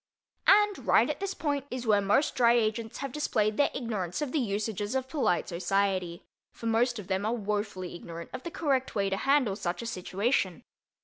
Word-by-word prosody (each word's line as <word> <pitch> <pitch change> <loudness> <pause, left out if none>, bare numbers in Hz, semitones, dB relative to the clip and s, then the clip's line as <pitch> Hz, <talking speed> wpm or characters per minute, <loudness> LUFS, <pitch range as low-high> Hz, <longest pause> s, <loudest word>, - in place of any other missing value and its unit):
And 415 0 +4
right - - +5
at - - -6
this 390 -1 -3
point 285 -3 -2
is 250 -1 -4
where 210 -2 +4
most 205 +9 +2
Dry 235 -1 +4
Agents 225 -1 0
have 275 -1 -4
displayed 215 -7 0
their 285 - +4
ignorance 205 -9 -3
of 295 -4 -2
the 310 - +1
usages 210 -1 -2
of 260 -1 -1
polite 265 - 0
society, 185 0 -1 0.3
for - - -11
most 235 +2 +2
of 210 - -6
them 190 +1 -1
are 220 +3 0
wofully 205 -4 -3
ignorant 170 -1 -8
of - - -5
the 340 - -5
correct 275 -8 -1
way 195 -2 +1
to 195 - 0
handle 270 -5 +2
such 180 +2 -3
a - - -6
situation. 195 - -1
220 Hz, 195 wpm, -29 LUFS, 195-260 Hz, 0.3 s, right